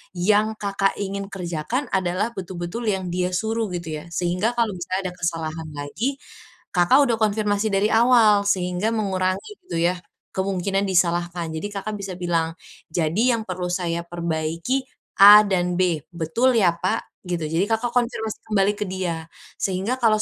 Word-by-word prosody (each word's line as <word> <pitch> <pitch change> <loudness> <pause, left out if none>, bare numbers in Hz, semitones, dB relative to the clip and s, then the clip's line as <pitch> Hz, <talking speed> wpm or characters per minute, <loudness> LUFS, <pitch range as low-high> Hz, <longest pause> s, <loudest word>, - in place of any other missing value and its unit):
yang 210 +4 +2
Kakak 195 -1 +1
ingin 200 0 -3
kerjakan 185 - -3
adalah 190 +3 0
betul-betul 180 +4 -5
yang 190 -3 -1
dia 180 0 0
suruh 225 +4 0
gitu 165 -3 -4
ya. - - -12
Sehingga 180 +7 0
kalau 230 -3 +2
misalnya 185 +1 -3
ada - - -12
kesalahan 160 -2 -3
lagi, 205 - -3 0.6
Kakak 180 +9 +5
udah 235 - +2
konfirmasi 210 0 +1
dari 200 +2 +3
awal, 225 -3 +5
sehingga 180 +1 0
mengurangi 190 - -1 0.2
gitu 170 - -4
ya 180 - -2 0.3
kemungkinan 195 +1 -1
disalahkan. 175 -2 +1
Jadi 160 +5 -4
Kakak 210 +1 -4
bisa 195 -2 -5
bilang, 170 -2 -1 0.4
"Jadi 180 +10 +2
yang 230 - -1
perlu 180 -1 -3
saya 170 -2 -2
perbaiki, 170 +8 -2 0.3
A 205 +1 +11
dan 180 -2 +1
B 175 -2 +2 0.2
betul 175 +11 +1
ya 180 - +5
Pak?" 185 - -2 0.2
gitu. 170 -4 -2
Jadi 165 +4 +1
Kakak 225 +3 0
konfirmasi 230 -3 -1 0.2
kembali 200 0 +3
ke 210 - -2
dia. 180 -4 -3 0.3
Sehingga 195 +6 -1
kalau 220 -4 +3
190 Hz, 155 wpm, -23 LUFS, 175-215 Hz, 0.6 s, A